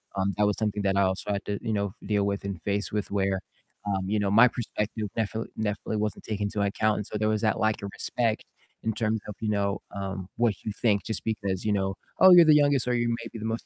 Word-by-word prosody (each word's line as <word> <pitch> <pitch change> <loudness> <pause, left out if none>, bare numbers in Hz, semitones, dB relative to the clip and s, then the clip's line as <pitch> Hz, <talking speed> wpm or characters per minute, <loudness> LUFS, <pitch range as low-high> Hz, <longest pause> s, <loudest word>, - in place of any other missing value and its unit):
um, 100 0 0
that 105 - +3
was 105 - +2
something 105 -1 -1
that 95 0 +1
I 100 - +3
also 95 +2 0
had 100 - -3
to, 105 - -2
you 110 - -1
know, 100 -2 -1
deal 105 -2 +1
with 100 0 -2
and 100 -4 -5
face 100 +2 -1
with 105 -1 -2
where, 95 -1 0 0.5
um, 95 -2 -1
you 105 +2 +1
know, 100 -1 +1
my 115 +5 +7
perspective 110 -2 -3
definitely 110 0 -2
definitely 105 0 -2
wasn't 105 -2 -3
taken 105 -1 -3
into 105 0 -1
account, 105 +2 +1
and 105 - -4
so 105 - -4
there 110 - 0
was 110 -1 0
that 110 -2 +1
lack 110 -1 +1
of 100 - -4
respect 115 -3 -1 0.4
in 110 - 0
terms 110 0 0
of, 105 - -6
you 110 - -2
know, 100 -1 0
um, 95 -1 -5
what 115 -4 +1
you 110 - -3
think 105 -1 +1
just 110 -3 -3
because, 100 -4 -2
you 105 - +2
know, 95 -1 0 0.2
"Oh, 190 - +9
you're 175 -2 +9
the 155 - +7
youngest," 145 -4 +3
or, 125 - +2
"You 120 -1 +1
may 115 0 -3
be 115 - -6
the 110 - -5
most 115 +1 -3
105 Hz, 260 wpm, -27 LUFS, 100-110 Hz, 0.5 s, Oh